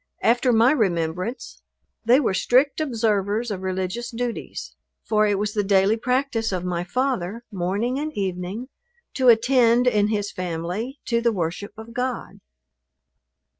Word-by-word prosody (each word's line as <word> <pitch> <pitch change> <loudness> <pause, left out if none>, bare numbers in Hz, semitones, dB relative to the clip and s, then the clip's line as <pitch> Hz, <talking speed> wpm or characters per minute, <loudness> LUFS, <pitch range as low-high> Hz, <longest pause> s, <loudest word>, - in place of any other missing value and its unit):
After 245 +2 +3
my 230 +2 +5
remembrance 185 - -2 0.4
they 245 +4 +6
were 245 -9 +1
strict 260 +10 +2
observers 220 -4 0
of 190 -2 -4
religious 190 +5 -3
duties; 240 0 -5 0.3
for 215 -1 +2
it 205 -1 +1
was 210 +1 -2
the 210 - 0
daily 195 +1 +3
practice 250 -1 0
of 180 -1 -3
my 175 -1 -1
father, 235 0 -2
morning 205 +8 -1
and 305 +1 -3
evening, 190 +5 -3 0.4
to 260 -2 +4
attend, 240 +1 +4
in 210 -4 +3
his 205 -1 -1
family, 185 - -4
to 235 -1 +1
the 235 0 +2
worship 185 +1 -3
of 220 +1 -10
God. 250 0 -3
220 Hz, 140 wpm, -23 LUFS, 190-245 Hz, 0.4 s, they